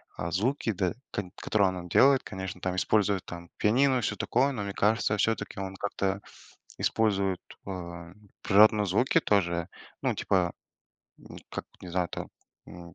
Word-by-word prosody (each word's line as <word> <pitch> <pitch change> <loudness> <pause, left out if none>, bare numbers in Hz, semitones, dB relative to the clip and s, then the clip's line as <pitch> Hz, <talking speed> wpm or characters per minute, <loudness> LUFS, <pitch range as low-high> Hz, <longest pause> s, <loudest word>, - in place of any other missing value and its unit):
а, 85 - -4
звуки, 115 +6 0
да, 90 -3 -1 0.2
кот 105 - -3
которые 100 -3 +2
он 90 0 -9
делает, 135 +7 +5
конечно, 95 -1 -6
там 90 0 -2
используют, 100 0 +2
там, 85 -1 -9
пианино 130 +5 +3
и - - 0
всё 105 - -1
такое. 135 +6 +1
Но 105 -5 -3
мне 100 -1 -4
кажется, 105 +1 +2
всё-таки 110 -1 -1
он 95 0 -5
как-то 100 0 -2 0.6
использует, 100 -4 +1 0.3
а, 85 -3 -7 0.3
природные 105 +1 +5
звуки 105 +8 +3
тоже. 85 -4 +1 0.4
Ну, - - +1
типа, 90 -3 +1 0.7
ну - - -13
как, - - -5 0.2
не 90 - -8
знаю 90 0 0
там, - - -6 0.4
м, 85 -1 -11
95 Hz, 160 wpm, -28 LUFS, 90-110 Hz, 0.7 s, делает